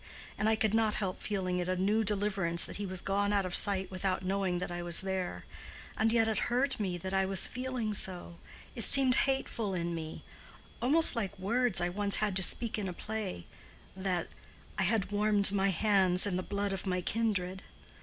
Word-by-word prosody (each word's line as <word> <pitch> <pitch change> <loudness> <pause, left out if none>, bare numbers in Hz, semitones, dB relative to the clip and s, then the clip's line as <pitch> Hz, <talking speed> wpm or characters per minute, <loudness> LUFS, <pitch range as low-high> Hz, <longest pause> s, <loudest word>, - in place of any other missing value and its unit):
And 210 +2 0
I 220 - +3
could 220 -2 -1
not 220 -1 +1
help 190 -3 -3
feeling 185 -3 -3
it 180 0 -3
a 185 - 0
new 205 +4 0
deliverance 195 -5 +3
that - - -5
he 205 -1 -5
was 185 -1 -5
gone 200 +1 -1
out 200 -2 0
of 180 - -5
sight 195 -1 +2
without 185 0 -3
knowing 190 -1 -1
that 180 0 -5
I 175 0 -5
was 175 -1 +3
there. 190 -1 -4 0.5
And 220 0 +1
yet 225 -1 +2
it 220 -3 0
hurt 260 +2 0
me 185 -4 -2
that 190 +2 -7
I 190 0 +1
was 190 -1 +3
feeling 250 -4 -4
so—it 185 +4 -2
seemed 265 +3 +5 0.2
hateful 230 -7 -2
in 170 -1 -3
me—almost 245 - +1
like 205 -3 -4
words 230 +3 +1
I 175 - -1
once 200 +2 +1
had 210 -3 -1
to - - -1
speak 220 +4 -1
in 200 - -4
a - - -6
play, 210 - -6 0.5
that 185 -2 -3 0.5
'I - - +2
had 205 0 0
warmed 205 -1 +4
my 195 -1 +1
hands 190 -1 +2
in 200 -3 -2
the 185 - -2
blood 200 +1 -3
of 195 0 -6
my 180 -1 -1
kindred. 195 -3 -2
195 Hz, 195 wpm, -30 LUFS, 185-215 Hz, 0.5 s, seemed